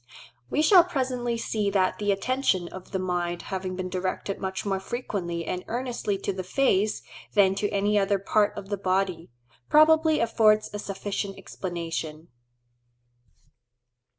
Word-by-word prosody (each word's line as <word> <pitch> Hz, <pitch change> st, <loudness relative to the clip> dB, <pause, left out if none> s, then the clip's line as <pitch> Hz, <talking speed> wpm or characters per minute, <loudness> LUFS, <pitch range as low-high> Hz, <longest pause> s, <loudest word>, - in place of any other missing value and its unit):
We 300 Hz, -, +1 dB
shall 360 Hz, +2 st, +8 dB
presently 255 Hz, -8 st, -2 dB
see 215 Hz, -3 st, -1 dB
that 190 Hz, -2 st, +1 dB
the 205 Hz, -1 st, +1 dB
attention 200 Hz, -4 st, 0 dB
of 185 Hz, -1 st, -10 dB
the 195 Hz, -, -2 dB
mind 175 Hz, -2 st, -2 dB
having 185 Hz, -1 st, -3 dB
been 185 Hz, 0 st, -3 dB
directed 185 Hz, +2 st, -3 dB
much 190 Hz, 0 st, -4 dB
more 195 Hz, -1 st, 0 dB
frequently 190 Hz, -6 st, -4 dB
and 180 Hz, 0 st, -3 dB
earnestly 240 Hz, -4 st, -2 dB
to 195 Hz, -, -3 dB
the 185 Hz, 0 st, -4 dB
face 210 Hz, -1 st, +1 dB, 0.3 s
than 195 Hz, -2 st, +5 dB
to 205 Hz, +1 st, -1 dB
any 205 Hz, +1 st, +2 dB
other 200 Hz, 0 st, +2 dB
part 205 Hz, +2 st, +1 dB
of 200 Hz, -1 st, -7 dB
the 205 Hz, -, -1 dB
body, 185 Hz, -2 st, -1 dB, 0.4 s
probably 315 Hz, 0 st, +5 dB
affords 215 Hz, -2 st, +3 dB
a 205 Hz, -, -4 dB
sufficient 200 Hz, 0 st, -4 dB
explanation. 165 Hz, -3 st, -5 dB
200 Hz, 145 wpm, -26 LUFS, 185-225 Hz, 0.4 s, shall